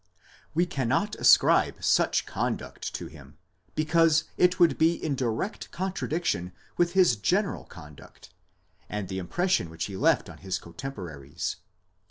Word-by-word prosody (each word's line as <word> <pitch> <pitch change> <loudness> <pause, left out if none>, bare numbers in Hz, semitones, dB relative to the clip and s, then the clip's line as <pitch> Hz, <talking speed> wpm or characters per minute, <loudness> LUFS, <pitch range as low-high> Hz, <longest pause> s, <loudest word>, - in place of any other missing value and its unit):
We 175 +2 +3
cannot 140 - -1
ascribe - - +4
such - - +2
conduct - - -3
to. - - -5
him, 75 -1 -13 0.4
because 155 0 +3
it 180 0 +3
would 170 -2 +4
be 165 +2 +4
in 155 -3 -3
direct 125 - -3
contradiction 170 - -2 0.2
with 175 0 +1
his 185 -10 +5
general 190 - 0
conduct, 75 -5 -14 0.6
and 105 -3 -4
the 95 0 -3
impression 175 - 0
which 80 0 -4
he 100 - -7
left - - +2
on - - -11
his 95 -1 -3
cotemporaries. 85 - -6
135 Hz, 135 wpm, -27 LUFS, -, 0.6 s, his